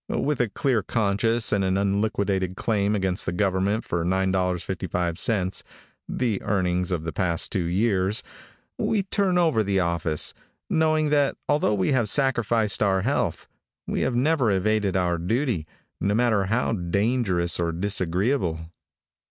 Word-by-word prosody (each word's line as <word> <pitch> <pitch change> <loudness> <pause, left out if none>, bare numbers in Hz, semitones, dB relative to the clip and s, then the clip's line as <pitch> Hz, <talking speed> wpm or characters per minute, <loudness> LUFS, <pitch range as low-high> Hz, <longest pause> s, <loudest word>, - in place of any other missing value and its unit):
With 145 -2 0
a 120 - 0
clear 120 +2 0
conscience 110 +2 0
and 100 -2 +2
an 95 0 +1
unliquidated 100 -2 0
claim 105 0 0
against 95 -2 -1
the - - +1
government 100 +3 0
for 85 -1 -2
$9.55, 95 +1 -1 0.5
the 115 -6 -1
earnings 90 -3 0
of 85 -3 -1
the 80 - -4
past 85 -3 -1
two 90 -3 -1
years, 95 +2 +1 0.6
we 210 -3 +1
turn 195 -1 +1
over 160 -11 +3
the 100 -1 +1
office, 85 -3 0 0.3
knowing 155 -1 +2
that 145 -2 +2
although 145 -7 +2
we 95 +4 +1
have 120 -6 +2
sacrificed 120 -6 +1
our 95 -2 +2
health, 140 +6 -1 0.4
we - - -2
have 130 - 0
never 135 -1 +2
evaded 100 0 +1
our 90 -2 0
duty, 110 - -1 0.3
no 100 +3 +1
matter 110 -4 +2
how 115 +6 0
dangerous 95 -2 0
or 85 -1 0
disagreeable. 90 - -1
100 Hz, 140 wpm, -25 LUFS, 90-120 Hz, 0.6 s, over